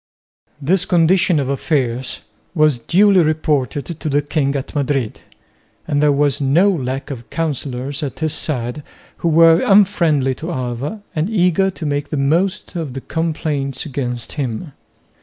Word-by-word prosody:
This 175 +6 +1
condition 175 -1 +3
of 135 - -1
affairs 130 -3 -1 0.3
was 150 -5 +3
duly 190 - +4
reported 150 -4 0
to 160 -2 -5
the 145 +1 +1
king 145 -1 0
at 135 - -4
Madrid; 135 -5 -1 0.7
and 145 0 +1
there 150 -1 +4
was 145 0 +1
no 165 +9 +4
lack 135 -3 -3
of 120 -4 -8
councillors 140 -3 -3
at 140 -4 -4
his 155 -1 -1
side 125 -3 -2 0.4
who - - -2
were 165 +1 +6
unfriendly 170 -9 +3
to 165 +7 -6
Alva 130 - -4
and 160 +5 0
eager 190 -2 +2
to 180 -4 -7
make 145 0 -2
the 150 - -2
most 170 +8 0
of 155 -7 -4
the 135 - -4
complaints 150 -4 -2
against 125 -5 -4
him. 140 +2 -4
150 Hz, 150 wpm, -18 LUFS, 135-165 Hz, 0.7 s, were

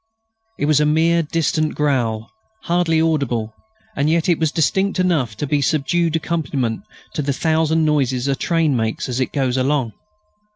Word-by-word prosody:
It - - -1
was 150 -1 +3
a 150 - +3
mere 165 +2 +3
distant 155 -1 -1
growl, 120 -7 -1 0.3
hardly 170 -2 +1
audible, 135 -9 0 0.4
and 145 +1 +1
yet 165 0 +1
it 175 -3 +2
was 160 -2 +1
distinct 190 +6 0
enough 150 - 0
to - - -2
be 145 +1 0
a - - -1
subdued 160 +4 +1
accompaniment 145 -8 -2 0.3
to - - -2
the 140 0 -1
thousand 160 +2 +1
noises 135 -4 +1
a 140 - +1
train 165 -2 +1
makes 110 -2 -2
as 125 0 -3
it 130 - -1
goes 130 -3 0
along. 130 -3 0
150 Hz, 170 wpm, -20 LUFS, 130-165 Hz, 0.4 s, was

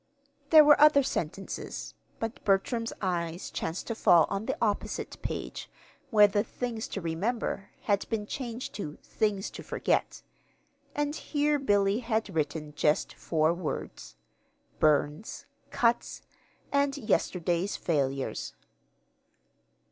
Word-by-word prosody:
There 310 -1 +9
were 295 0 +6
other 300 -2 +7
sentences, 190 -4 -4 0.3
but 225 +1 -4
Bertram's 230 +4 +1
eyes 170 -1 -2
chanced 165 +3 -3
to 230 - -2
fall 175 -6 +5
on 200 +2 -2
the - - -1
opposite 210 -3 -2
page - - -5 0.4
where 210 -2 +7
the 205 0 +1
"Things 235 -1 -4
to 195 - -5
Remember" 195 +5 -2
had 200 -2 0
been 220 -2 -1
changed 240 +1 -5
to 150 -7 -6
"Things 205 -3 -1
to - - -8
Forget"; - - -1 0.7
and 295 0 -1
here 295 -1 0
Billy 205 -4 +2
had 225 -4 -1
written 150 -1 -2
just 150 +1 +1
four 160 0 +1
words: 175 -3 -5 0.6
"Burns," 155 - +1 0.2
"cuts," 235 0 0 0.5
and 280 0 +2
"yesterday's 180 - 0
failures." 135 -4 -1
205 Hz, 115 wpm, -29 LUFS, 170-240 Hz, 0.7 s, There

